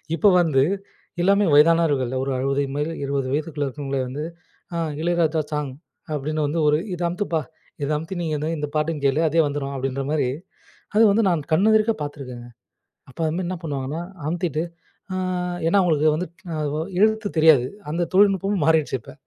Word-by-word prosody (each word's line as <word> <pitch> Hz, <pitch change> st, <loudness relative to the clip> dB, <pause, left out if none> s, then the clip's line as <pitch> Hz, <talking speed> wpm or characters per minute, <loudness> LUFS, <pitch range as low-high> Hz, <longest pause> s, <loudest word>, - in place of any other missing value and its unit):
இப்ப 205 Hz, +3 st, +5 dB
வந்து 145 Hz, -6 st, +3 dB, 0.6 s
எல்லாமே 200 Hz, +2 st, +4 dB
வயதானவர்கள் 150 Hz, -4 st, +4 dB
ஒரு 135 Hz, -, -2 dB
60 135 Hz, +2 st, +1 dB
மேல 150 Hz, +2 st, -1 dB
20 140 Hz, -1 st, -1 dB
வயதுக்குள்ளே 150 Hz, 0 st, -2 dB
இருக்கிறவங்களே 135 Hz, 0 st, -3 dB
வந்து 140 Hz, +4 st, -5 dB, 0.5 s
அ -, -, -1 dB, 0.2 s
இளையராஜா 165 Hz, -2 st, +1 dB
சாங். 150 Hz, -2 st, -2 dB, 0.4 s
அப்பிடின்னு 150 Hz, +1 st, -1 dB
வந்து 160 Hz, +4 st, -1 dB
ஒரு 150 Hz, 0 st, +4 dB, 0.2 s
இத 180 Hz, -, -5 dB
அமுத்துப்பா! 170 Hz, -2 st, -1 dB, 0.4 s
இத 140 Hz, -, -1 dB
அமுத்தி 165 Hz, +5 st, -6 dB
நீங்க 160 Hz, -2 st, -1 dB
வந்து 150 Hz, +2 st, -2 dB
இந்த 150 Hz, 0 st, -2 dB
பாட்டையும் 155 Hz, -1 st, -1 dB
கேளு. 135 Hz, +2 st, +3 dB
அதே 165 Hz, -, +1 dB
வந்துரும் 140 Hz, -1 st, -3 dB
அப்பிடின்றமாரி 135 Hz, +1 st, -1 dB, 0.7 s
அது 225 Hz, -, +7 dB
வந்து 215 Hz, +3 st, +3 dB
நான் 170 Hz, -3 st, +1 dB
கண் 185 Hz, +7 st, +4 dB
எதிர்க்க 220 Hz, +1 st, +4 dB
பார்த்துருக்கேங்க. 130 Hz, -5 st, -7 dB, 0.4 s
அ -, -, -26 dB
அப்ப 130 Hz, -, -17 dB
வந்து 170 Hz, +4 st, -2 dB
என்ன 185 Hz, +2 st, -2 dB
பண்ணுவாங்கன்னா 145 Hz, 0 st, -3 dB, 0.3 s
அமுத்திட்டு, 165 Hz, -2 st, -1 dB, 0.5 s
ஆ -, -, -2 dB, 0.5 s
ஏன்னா 200 Hz, -, +3 dB
அவுங்களுக்கு 155 Hz, -3 st, +3 dB
வந்து 180 Hz, +4 st, -3 dB, 0.3 s
அதுவோ 150 Hz, 0 st, -2 dB, 0.2 s
எழுத்து 220 Hz, 0 st, +3 dB
தெரியாது. 155 Hz, -5 st, +6 dB, 0.3 s
அந்த 170 Hz, +2 st, -1 dB
தொழில்நுட்பமும் 195 Hz, -2 st, +3 dB
மாறிருச்சு 160 Hz, -3 st, +3 dB
இப்ப. -, -, -12 dB
155 Hz, 160 wpm, -23 LUFS, 140-170 Hz, 0.7 s, அது